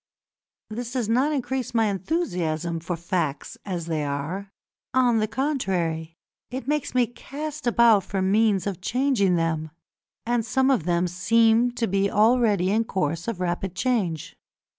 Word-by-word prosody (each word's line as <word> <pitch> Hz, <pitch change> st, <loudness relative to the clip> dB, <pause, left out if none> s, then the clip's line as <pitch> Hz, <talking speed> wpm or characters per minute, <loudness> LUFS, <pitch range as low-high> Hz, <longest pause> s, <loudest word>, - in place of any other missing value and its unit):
This 240 Hz, +2 st, -5 dB
does 250 Hz, -5 st, -1 dB
not 255 Hz, +7 st, +2 dB
increase 260 Hz, -3 st, -2 dB
my 225 Hz, -1 st, +4 dB
enthusiasm 180 Hz, -, -1 dB
for 170 Hz, +2 st, -3 dB
facts 170 Hz, -4 st, -2 dB
as 180 Hz, -5 st, -3 dB
they 160 Hz, -2 st, -1 dB
are; 150 Hz, +8 st, -4 dB, 0.4 s
on 245 Hz, -3 st, +4 dB
the 215 Hz, -, +1 dB
contrary, 180 Hz, -, -2 dB, 0.3 s
it 255 Hz, 0 st, -6 dB
makes 295 Hz, -3 st, -1 dB
me 250 Hz, -1 st, +4 dB
cast 290 Hz, +4 st, -7 dB
about 230 Hz, -4 st, +5 dB
for 195 Hz, +1 st, -3 dB
means 200 Hz, +1 st, +2 dB
of 195 Hz, -3 st, -4 dB
changing 240 Hz, -5 st, +2 dB
them, 160 Hz, -2 st, -1 dB, 0.6 s
and 240 Hz, 0 st, +1 dB
some 265 Hz, +4 st, +2 dB
of 215 Hz, -, +1 dB
them 175 Hz, 0 st, +1 dB
seem 225 Hz, +6 st, +3 dB
to 240 Hz, -, -1 dB
be 195 Hz, 0 st, +1 dB
already 210 Hz, -4 st, +3 dB
in 220 Hz, +2 st, +2 dB
course 170 Hz, -5 st, -2 dB
of 230 Hz, -6 st, -3 dB
rapid 180 Hz, +1 st, -2 dB
change. 190 Hz, -, -1 dB
205 Hz, 150 wpm, -25 LUFS, 175-245 Hz, 0.6 s, about